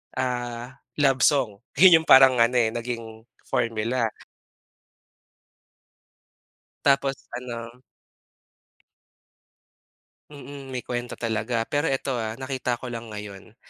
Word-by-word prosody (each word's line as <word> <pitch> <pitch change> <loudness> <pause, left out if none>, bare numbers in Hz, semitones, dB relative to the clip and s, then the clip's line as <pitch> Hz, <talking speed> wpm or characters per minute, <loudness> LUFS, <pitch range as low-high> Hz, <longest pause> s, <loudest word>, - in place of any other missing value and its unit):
ah, 125 0 -3 0.2
love 135 -2 +3
song. 120 -7 +2 0.2
Yun 180 -1 +9
yung - - -20
parang 130 -2 +7
ano, 115 +2 +3
eh, 115 -2 +3
naging 115 -2 -6 0.2
formula. 115 0 -1 2.7
Tapos, 135 -1 +1
ano. 120 0 -7 2.5
Mm, 140 -1 -10
may 130 -2 -5
kuwento 120 0 -4
talaga. 115 0 -2
Pero 145 +6 -1
eto, 135 0 -1
ah, 110 0 -4
nakita 130 -2 -3
ko 120 0 -8
lang 115 -1 -7
ngayon, 105 0 -10
120 Hz, 100 wpm, -25 LUFS, 115-135 Hz, 2.7 s, Yun